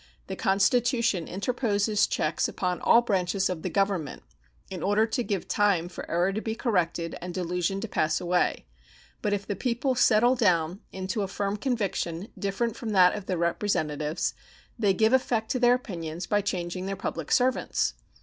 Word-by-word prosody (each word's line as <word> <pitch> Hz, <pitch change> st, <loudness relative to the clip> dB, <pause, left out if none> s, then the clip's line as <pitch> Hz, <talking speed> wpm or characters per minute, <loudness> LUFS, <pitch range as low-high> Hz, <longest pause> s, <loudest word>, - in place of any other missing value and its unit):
The 190 Hz, -, -5 dB
Constitution 225 Hz, -, +2 dB
interposes 210 Hz, 0 st, 0 dB
checks 155 Hz, -, 0 dB
upon 180 Hz, -1 st, -2 dB
all 235 Hz, -, +5 dB
branches 190 Hz, -3 st, 0 dB
of 170 Hz, -3 st, -4 dB
the -, -, -3 dB
Government, 195 Hz, -7 st, -1 dB, 0.4 s
in 185 Hz, -3 st, -7 dB
order 205 Hz, +4 st, +3 dB
to 230 Hz, +3 st, -2 dB
give 200 Hz, -5 st, -3 dB
time 200 Hz, -5 st, +2 dB
for 175 Hz, -, -8 dB
error 175 Hz, +3 st, +1 dB
to 215 Hz, -, -2 dB
be 220 Hz, 0 st, -3 dB
corrected 175 Hz, -8 st, -1 dB
and 175 Hz, 0 st, -6 dB
delusion 180 Hz, +1 st, -1 dB
to 225 Hz, -, -3 dB
pass 155 Hz, -6 st, 0 dB
away; 180 Hz, -, 0 dB, 0.6 s
but 210 Hz, -, 0 dB
if 200 Hz, -1 st, -1 dB
the 205 Hz, -, -3 dB
people 250 Hz, +5 st, 0 dB
settle 240 Hz, 0 st, +4 dB
down 180 Hz, -6 st, +1 dB
into 190 Hz, +2 st, -3 dB
a 195 Hz, -, -1 dB
firm 200 Hz, +1 st, -2 dB
conviction 205 Hz, -6 st, -2 dB
different 210 Hz, +3 st, -2 dB
from 230 Hz, -, -5 dB
that 180 Hz, -2 st, +6 dB
of 205 Hz, -2 st, -6 dB
their 185 Hz, -, -1 dB
representatives 160 Hz, -3 st, -1 dB, 0.5 s
they 200 Hz, -4 st, +3 dB
give 220 Hz, +5 st, +3 dB
effect 235 Hz, -4 st, +1 dB
to 255 Hz, -, 0 dB
their 245 Hz, 0 st, +5 dB
opinions 175 Hz, -8 st, -5 dB
by 205 Hz, 0 st, +1 dB
changing 185 Hz, -2 st, -3 dB
their 195 Hz, -, -2 dB
public 165 Hz, -5 st, -5 dB
servants. 255 Hz, +1 st, +1 dB
195 Hz, 170 wpm, -27 LUFS, 180-220 Hz, 0.6 s, that